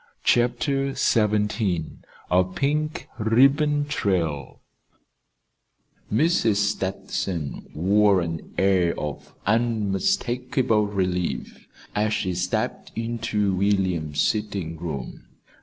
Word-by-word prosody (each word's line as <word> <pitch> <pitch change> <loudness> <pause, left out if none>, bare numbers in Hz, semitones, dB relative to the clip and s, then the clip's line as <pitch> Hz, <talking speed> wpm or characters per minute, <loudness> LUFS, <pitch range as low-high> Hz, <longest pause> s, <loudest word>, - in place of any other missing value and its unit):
CHAPTER 135 +3 +1
XVII 105 -6 +1 0.3
A 90 +1 +5
PINK 150 - -2
RIBBON 140 +6 +3
TRAIL 85 - -1 1.5
Mrs. 115 - +3
Stetson 95 -5 -2
wore 100 +4 +4
an 80 -1 -5
air 95 -3 +2
of 75 -1 -6
unmistakable 115 - +1
relief 90 -3 -2 0.3
as 105 +1 +1
she 95 -4 -1
stepped 90 +1 -2
into 110 -3 -1
William's 95 -6 +1
sitting 100 -6 -1
room. 75 -7 -6
105 Hz, 80 wpm, -24 LUFS, 90-120 Hz, 1.5 s, A